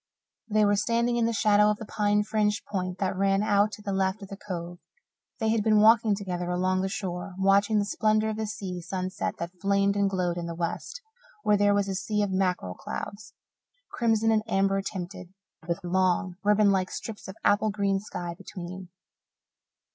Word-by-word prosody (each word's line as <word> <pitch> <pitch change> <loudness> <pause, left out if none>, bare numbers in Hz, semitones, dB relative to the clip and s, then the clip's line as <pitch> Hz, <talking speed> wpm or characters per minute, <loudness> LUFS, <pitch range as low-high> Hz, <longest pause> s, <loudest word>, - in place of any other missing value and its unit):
They 215 0 +3
were 205 0 +3
standing 235 +3 +1
in 230 -1 +2
the - - 0
shadow 210 -1 +4
of 210 - 0
the 220 - -8
pine 210 0 +1
fringed 210 0 0
point 185 -2 -3
that 190 0 -1
ran 195 +1 +2
out 205 0 +3
to 210 - -9
the 200 -1 -2
left 190 +2 0
of 195 - -10
the 195 - -6
Cove. 175 -3 -6 0.6
They 220 -2 +1
had 225 -1 +2
been 215 0 +4
walking 220 -1 +5
together 180 -3 -4
along 185 +1 +1
the 190 - -1
shore, 190 -2 -5
watching 200 +3 +3
the 205 - +2
splendour 215 +1 +1
of 215 - -5
the 220 -1 -2
sea 195 -4 -5
sunset 185 +1 -3
that 175 +2 -7
flamed 200 0 +2
and 200 -1 +2
glowed 180 -2 -1
in 170 - -4
the 170 - -5
west, 170 - -4 0.4
where 210 - +4
there 205 0 +3
was 200 -1 +1
a 195 - -2
sea 210 +2 -1
of 200 - -2
mackerel 180 - 0
clouds, 210 - -7 0.6
crimson 225 -2 +2
and 220 -1 +3
amber 195 -1 +1
tinted, 185 -1 -7 0.3
with 170 +2 -2
long, 185 0 +1
ribbon 210 0 +4
like 190 -1 +1
strips 220 -2 -7
of 190 - -8
apple 215 +1 +3
green 200 -1 0
sky 175 -4 -6
between. 180 +1 -8
200 Hz, 195 wpm, -27 LUFS, 185-210 Hz, 0.6 s, walking